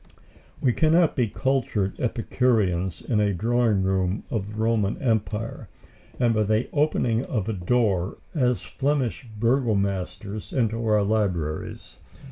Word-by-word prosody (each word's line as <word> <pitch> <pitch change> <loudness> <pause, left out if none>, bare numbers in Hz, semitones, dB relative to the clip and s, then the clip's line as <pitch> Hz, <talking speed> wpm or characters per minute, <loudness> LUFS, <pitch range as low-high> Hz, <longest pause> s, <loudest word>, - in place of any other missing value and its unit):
We 125 - +2
cannot 160 +3 +3
be 125 -4 +2
cultured 115 -5 -1
Epicureans 105 -7 0
in 110 -4 0
a 100 -2 +2
drawing 115 0 +2
room 95 +1 0
of 105 -4 -2
the 105 - -8
Roman 110 -2 +1
Empire, 110 -2 -2 0.5
and 120 -2 +3
by 110 - +1
the 110 +3 +1
opening 130 -6 +1
of 110 -5 -2
a 110 - -1
door 95 -1 +1
walk 100 - -9
as 125 -6 +1
Flemish 135 -3 -1
Burgomasters 100 -5 -1
into 115 -2 0
our 105 -1 +3
libraries. 95 -8 -2
110 Hz, 130 wpm, -25 LUFS, 100-125 Hz, 0.5 s, cannot